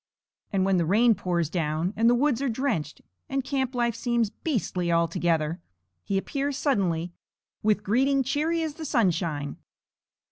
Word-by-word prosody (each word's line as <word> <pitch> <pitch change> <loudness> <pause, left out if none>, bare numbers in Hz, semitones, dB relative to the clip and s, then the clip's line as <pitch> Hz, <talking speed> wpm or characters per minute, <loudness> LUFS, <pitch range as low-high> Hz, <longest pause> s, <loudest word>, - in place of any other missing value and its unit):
And 190 -2 +1
when 195 -1 +3
the 170 - +2
rain 225 +6 +5
pours 180 -4 -1
down, 160 +2 -1
and 230 +1 +4
the 245 - +5
woods 265 -1 +1
are 275 - 0
drenched, 225 - -2 0.3
and 270 0 -1
camp 265 -2 -2
life 240 -1 +1
seems 235 -1 0
beastly 195 - -2
altogether, 170 -1 +1 0.4
he 195 - -1
appears 275 +7 -2
suddenly 180 - 0 0.5
with 210 -1 +2
greeting 270 +6 +2
cheery 310 +5 0
as 315 -2 -3
the 315 +1 -7
sunshine. 170 - 0
215 Hz, 150 wpm, -26 LUFS, 175-265 Hz, 0.5 s, rain